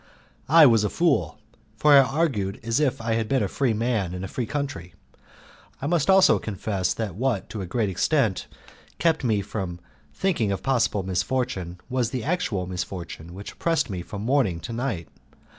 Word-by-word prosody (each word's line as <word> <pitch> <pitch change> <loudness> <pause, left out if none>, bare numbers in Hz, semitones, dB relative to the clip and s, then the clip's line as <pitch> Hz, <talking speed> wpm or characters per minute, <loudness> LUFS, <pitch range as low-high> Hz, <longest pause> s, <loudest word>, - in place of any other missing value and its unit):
I 160 +1 +8
was 115 -5 +5
a 105 - +1
fool, 165 - +1 0.4
for 150 +5 +5
I 140 - +10
argued 130 -8 0
as 115 +3 0
if 145 -5 +1
I 115 0 -1
had 115 -1 -1
been 135 -5 +2
a - - 0
free 120 +2 0
man 110 -6 -1
in 90 - -5
a - - -3
free 120 +4 -4
country. 135 - -4 0.8
I - - -5
must 160 0 +1
also 190 0 +6
confess 100 -2 -2
that 110 -5 -3
what 115 0 -1
to 105 - -5
a 95 - -5
great 110 +3 0
extent 95 - +1 0.5
kept 160 -3 +1
me 110 -5 +1
from 95 -4 -5 0.3
thinking 160 - 0
of 95 - -3
possible 120 -7 +1
misfortune 95 -2 -2
was 125 -3 0
the 125 -3 -4
actual 135 - -1
misfortune 90 -2 -6
which 100 +2 -8
oppressed 165 -9 0
me 90 -2 -3
from 100 +3 -7
morning 120 -9 +1
to 115 - -6
night. 115 - -3
115 Hz, 180 wpm, -25 LUFS, 95-135 Hz, 0.8 s, I